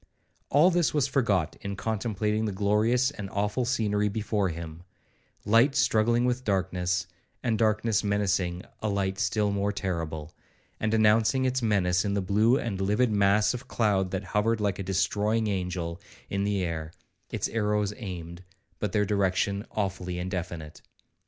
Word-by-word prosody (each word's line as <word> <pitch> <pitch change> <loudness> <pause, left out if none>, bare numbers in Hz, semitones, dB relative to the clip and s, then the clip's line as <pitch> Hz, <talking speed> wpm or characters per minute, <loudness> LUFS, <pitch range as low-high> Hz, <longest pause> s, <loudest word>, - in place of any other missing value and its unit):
—All 155 +6 +5
this 170 -3 +1
was 145 -4 +3
forgot 115 - 0
in 100 0 -4
contemplating 110 0 -1
the 105 - -1
glorious 105 +7 +2
and 105 -9 -7
awful 105 +6 -1
scenery 105 -4 +1
before 105 -1 -1
him,—light 90 - -2
struggling 115 +2 +3
with 125 +1 0
darkness,—and 95 +3 -2
darkness 110 0 +2
menacing 95 -3 0 0.2
a 110 - -1
light 95 -1 -1
still 100 +3 +1
more 100 0 0
terrible, 80 -5 -4 0.5
and 110 +1 +1
announcing 110 +4 +3
its 130 0 0
menace 95 -5 +2
in 100 -1 -1
the - - +1
blue 110 +7 +3
and 100 -8 -3
livid 105 +5 +2
mass 100 +2 +3
of 125 +1 -7
cloud 100 -6 +1
that 95 +1 -3
hovered 105 +4 0
like 100 -3 -1
a - - -1
destroying 100 +4 0
angel 90 -3 -3 0.3
in 100 0 0
the 100 -2 0
air, 80 -2 -3 0.4
its - - -2
arrows 105 -2 0
aimed, 85 -4 -7 0.4
but 105 -3 -2
their 105 -1 +2
direction 100 0 0
awfully 95 -3 -3
indefinite. 90 -4 -5
100 Hz, 145 wpm, -27 LUFS, 95-110 Hz, 0.5 s, All